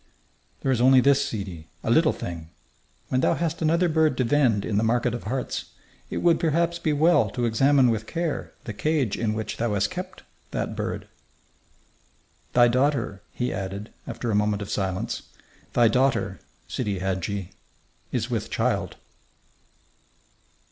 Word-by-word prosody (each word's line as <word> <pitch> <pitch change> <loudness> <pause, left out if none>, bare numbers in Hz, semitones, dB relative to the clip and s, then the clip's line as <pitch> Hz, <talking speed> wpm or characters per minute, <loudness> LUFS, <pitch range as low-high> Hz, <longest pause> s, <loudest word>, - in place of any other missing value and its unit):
"There 135 - +1
is 120 -2 +1
only 130 +1 +7
this, 140 +2 +4
sidi, 95 - -5 0.2
a - - 0
little - - +5
thing: 80 -2 -6 0.6
When 130 - +1
thou - - +3
hast 165 -1 -2
another 165 +3 +3
bird 155 -4 +2
to 130 - +2
vend 120 -5 +2
in 105 - -1
the 110 - +2
market 120 +1 +1
of 120 - -5
hearts, 125 +4 -3 0.4
it - - -3
would 170 -2 +4
perhaps 170 +1 +1
be 160 -2 0
well 160 +4 +4
to 120 -2 -2
examine 130 +2 +4
with 110 -1 -3
care 165 -3 -2
the 110 - -5
cage 145 -2 0
in 110 -2 -1
which 110 0 -4
thou 115 -2 0
hast 100 +1 +1
kept 185 +1 -7 0.3
that - - -3
bird. - - -4 1.5
"Thy 120 -1 +6
daughter," 130 -5 +1
he 125 0 -2
added, 100 +2 -5 0.2
after 120 - -3
a - - +1
moment 105 0 +1
of 100 - -7
silence 95 -2 -2 0.5
"thy 120 -1 +5
daughter, 125 -5 +1 0.3
Sidi 100 -2 -2
Hadji, 95 0 -2 0.6
is - - -1
with - - -2
child." - - 0
120 Hz, 155 wpm, -25 LUFS, 105-145 Hz, 1.5 s, only